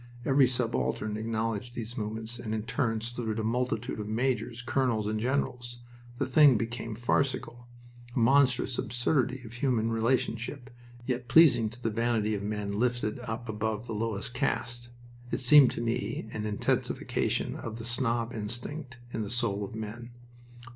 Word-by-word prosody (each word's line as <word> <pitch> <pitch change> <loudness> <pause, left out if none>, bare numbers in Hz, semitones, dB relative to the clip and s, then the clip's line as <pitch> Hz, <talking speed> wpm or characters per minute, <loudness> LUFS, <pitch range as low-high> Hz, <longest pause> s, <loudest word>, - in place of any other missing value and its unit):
Every 135 -1 +5
subaltern 115 -3 -1
acknowledged 115 +1 -2
these 120 0 -5
movements 110 +1 -4
and 110 -2 -3
in 110 - -2
turn 115 -2 0
saluted 115 -1 -3
a 110 - -1
multitude 120 +1 -1
of 105 - -4
majors, 120 +1 -1
colonels, 120 -4 +1
and 110 +1 -1
generals. 120 -1 -2 0.4
The - - 0
thing 140 -2 +6
became 115 0 -4
farcical, 120 0 -1 0.5
a - - -3
monstrous 130 0 +3
absurdity 130 +2 0
of 110 - -10
human 120 -3 +1
relationship, 120 +2 -1 0.3
yet 125 -1 -2
pleasing 120 -7 +6
to 115 +3 -14
the 115 - +1
vanity 115 -1 +1
of 100 - -2
men 105 0 -3
lifted 120 +1 0
up 120 -1 -5
above 110 +1 -2
the 115 - -5
lowest 110 +1 -2
caste. 120 -2 -2 0.4
It - - -1
seemed 135 +1 +8
to - - -4
me 115 -1 -2
an 105 0 -3
intensification 105 -1 0
of 115 -1 -6
the 115 - -7
snob 120 -1 0
instinct 125 +5 -5 0.2
in 110 - -2
the 105 - -3
soul 115 -4 0
of 100 - -6
man. 110 +2 -6
115 Hz, 155 wpm, -29 LUFS, 110-125 Hz, 0.5 s, seemed